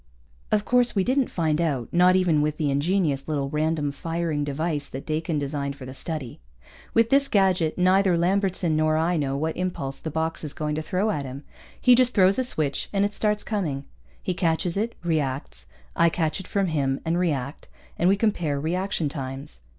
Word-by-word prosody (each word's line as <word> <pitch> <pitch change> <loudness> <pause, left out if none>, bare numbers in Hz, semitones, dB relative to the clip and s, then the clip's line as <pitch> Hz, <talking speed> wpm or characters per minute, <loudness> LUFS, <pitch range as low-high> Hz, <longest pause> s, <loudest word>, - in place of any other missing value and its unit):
Of 210 -1 +2
course, 245 -1 +3
we 195 - +3
didn't 260 +4 +1
find 160 -2 0
out, 140 -8 -1
not 180 +1 +5
even 175 -5 +3
with 150 0 -1
the 150 -3 0
ingenious 145 -1 0
little 140 -3 -2
random 155 -1 0
firing 165 0 -2
device 145 +1 -2
that 135 - -7
Dakin 155 +1 -1
designed 140 -1 -3
for 135 - -10
the 130 - -8
study. 140 -4 -5 0.6
With 230 0 +4
this 275 0 +5
gadget, 185 - +2
neither 185 0 +4
Lambertson 185 -2 +1
nor 155 0 +2
I 165 +3 +1
know 140 -3 -1
what 160 +2 -2
impulse 175 -7 -3
the 160 - -5
box 160 +2 -2
is 150 -2 -3
going 150 -1 -2
to 155 - -2
throw 185 +7 0
at 145 -8 -2
him. 135 +2 -7 0.4
He 250 - +6
just 250 0 +3
throws 195 +2 +5
a - - +2
switch 155 - -1
and 200 0 +2
it 205 - -2
starts 210 0 0
coming. 155 -11 -2 0.4
He 185 - -1
catches 170 0 0
it, 220 +4 -1
reacts, 135 - -2 0.3
I 170 0 +4
catch 160 0 -1
it 190 - -9
from 200 -1 0
him 140 -4 0
and 165 +2 +1
react, 145 -6 -2 0.3
and 175 - +4
we 195 - +5
compare 175 -9 0
reaction 175 +2 -1
times. 135 - -6
160 Hz, 195 wpm, -25 LUFS, 145-185 Hz, 0.6 s, He